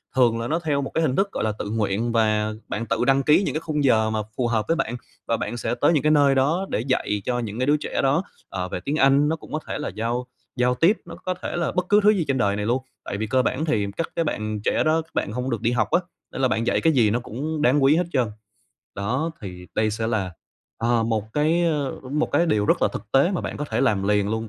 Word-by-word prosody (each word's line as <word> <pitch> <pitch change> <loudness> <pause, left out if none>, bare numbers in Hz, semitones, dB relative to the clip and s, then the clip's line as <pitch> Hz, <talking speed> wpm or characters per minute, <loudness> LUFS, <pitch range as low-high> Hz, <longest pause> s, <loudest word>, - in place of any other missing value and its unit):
thường 120 -3 +3
là 115 - -3
nó 165 +5 0
theo 150 -4 0
một 135 - -4
cái - - +1
hình 135 -4 +1
thức, 195 +1 +1
gọi - - -3
là, 110 - +1
tự 105 - -4
nguyện 110 +1 -1
và 110 -1 +1
bạn 115 +2 -3
tự 115 +1 0
đăng 135 +1 +3
ký 150 +7 +4
những - - -1
cái 155 - -1
khung 150 -3 -1
giờ 110 -4 +3
mà 110 - -1 0.2
phù 125 -2 +1
hợp 110 -2 0
với 165 - +2
bạn 120 -7 -2 0.3
và 115 - +1
bạn 120 +3 -4
sẽ 115 +1 -2
tới - - +5
những 145 -5 +2
cái 155 - +4
nơi 140 -2 +4
đó 160 +8 +2
để - - -1
dạy 115 -5 -1
cho 125 -1 0
những 115 -1 -5
cái 130 - +1
đứa 150 +1 +4
trẻ - - -2
đó, 140 +7 +2 0.3
ờ, 90 -1 -4
về 90 - -3
tiếng 140 +11 -3
Anh, 140 +1 +4
nó 160 - +1
cũng - - -13
có 155 - 0
thể - - -3
là - - -3
giao 115 +5 -3 0.3
giao 125 0 +2
tiếp, 170 - +3
nó - - -9
có 185 - -3
thể - - -3
là 170 -2 0
bất 180 0 -1
cứ 205 0 +6
thứ 210 - +6
gì 190 -6 +2
trên 135 -1 +1
đời 100 -3 +1
này 105 0 -2
luôn. 125 +4 0 0.2
Tại 100 - -4
vì 110 +1 -2
cơ 130 +4 +3
bản 130 +4 -1
thì 105 -10 0
các 165 - -2
cái 165 - 0
bạn 110 -6 -3
trẻ - - +2
đó, 160 +1 +2
các 160 - -19
bạn - - -1
hông 125 +3 -3
được 115 -3 -2
đi 120 +1 +1
học 110 -4 0
á, 175 - +4 0.3
nên - - -4
là 130 - +4
bạn 115 -1 -1
dạy - - +2
cái 160 - +3
gì 115 -6 +4
nó 120 - +1
cũng 150 +7 -4
đáng 135 +1 +3
quý 140 +3 +5
hết 175 - +2
trơn. 130 -4 +2 0.7
Đó 125 +11 -1
thì 90 -3 -8
đây 110 0 +1
sẽ 110 +1 -2
là, 100 -6 -1 0.5
ờ, 115 0 +2
một 110 -1 -2
cái, 160 +4 +2
ơ, 150 -5 0 0.2
một 150 +1 0
cái 170 - +3
điều 105 -9 +1
rất - - +2
là - - +4
thực 110 - -8
tế 135 +7 +4
mà 185 - -1
bạn - - -5
có 150 - -3
thể - - 0
làm 105 -7 +2
liền 105 -1 +2
luôn 110 0 -2
125 Hz, 290 wpm, -23 LUFS, 110-150 Hz, 0.7 s, cứ